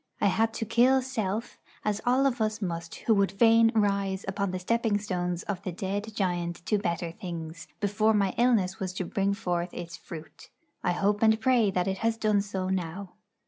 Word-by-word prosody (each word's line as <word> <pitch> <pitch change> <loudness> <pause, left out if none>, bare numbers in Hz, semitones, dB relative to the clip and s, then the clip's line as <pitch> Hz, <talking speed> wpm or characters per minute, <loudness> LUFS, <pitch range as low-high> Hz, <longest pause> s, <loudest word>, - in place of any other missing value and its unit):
I 200 - +3
had 225 +3 +2
to 225 - -2
kill 250 +4 +4
Self 225 -4 -3 0.3
as 210 -1 0
all 260 +3 +4
of 250 -4 +1
us 215 0 0
must 170 -4 -4
who 225 - +1
would 200 -2 +2
fain 225 +2 +5
rise 200 -2 +1
upon 200 0 -1
the 185 - -3
stepping 225 +3 +1
stones 180 -4 -2
of 195 -3 -4
the 185 - -4
dead 205 +4 -4
giant 175 -3 -2
to 210 - +1
better 170 -3 -2
things, 170 -4 -7
before 215 +2 +2
my 200 -2 +2
illness 225 -6 +2
was 185 -1 -3
to 185 -1 -3
bring 200 +3 0
forth 175 -3 -2
its 170 -1 -6
fruit. 160 -2 -11 0.3
I 180 - +2
hope 205 +3 +1
and 220 0 +4
pray 235 -3 +3
that 185 -1 0
it 190 0 -1
has 225 +1 0
done 215 -2 +2
so 195 -2 -3
now. 185 +1 -3
200 Hz, 195 wpm, -28 LUFS, 180-220 Hz, 0.3 s, fain